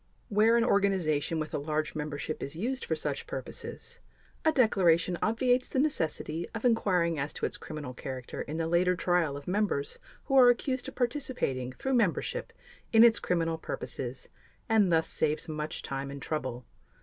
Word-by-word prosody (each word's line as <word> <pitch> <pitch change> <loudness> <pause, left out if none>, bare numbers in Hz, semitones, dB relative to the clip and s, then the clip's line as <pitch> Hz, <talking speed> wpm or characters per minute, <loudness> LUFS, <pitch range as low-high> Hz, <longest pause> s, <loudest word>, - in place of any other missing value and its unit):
Where 220 +2 +4
an 235 - +3
organization 180 - +1
with 155 0 -4
a - - 0
large 155 +1 -2
membership 150 0 -4
is 140 - -5
used 250 +9 -2
for - - 0
such - - -4
purposes, - - -7 0.4
a 315 - +4
declaration 180 - +3
obviates 245 +3 +2
the - - -3
necessity 170 - 0
of 225 - -4
inquiring 180 -9 +2
as 140 +2 -3
to - - -2
its - - -3
criminal 150 -5 -7
character 130 -1 -6
in 155 - -5
the 165 - 0
later 175 +2 +3
trial 175 -5 +1
of 145 - -11
members 185 -7 -1 0.2
who 270 - -1
are 250 -1 +9
accused 255 +1 0
of - - -8
participating 240 - -1
through 265 - -3
membership 235 - 0 0.4
in 225 0 +7
its 235 -1 +6
criminal 165 -2 0
purposes 130 -4 -5 0.4
and 210 -5 +4
thus 160 -1 +3
saves 155 0 -1
much 155 -1 -4
time 135 0 -4
and 140 0 -7
trouble. 130 -6 -3
170 Hz, 170 wpm, -30 LUFS, 150-225 Hz, 0.4 s, are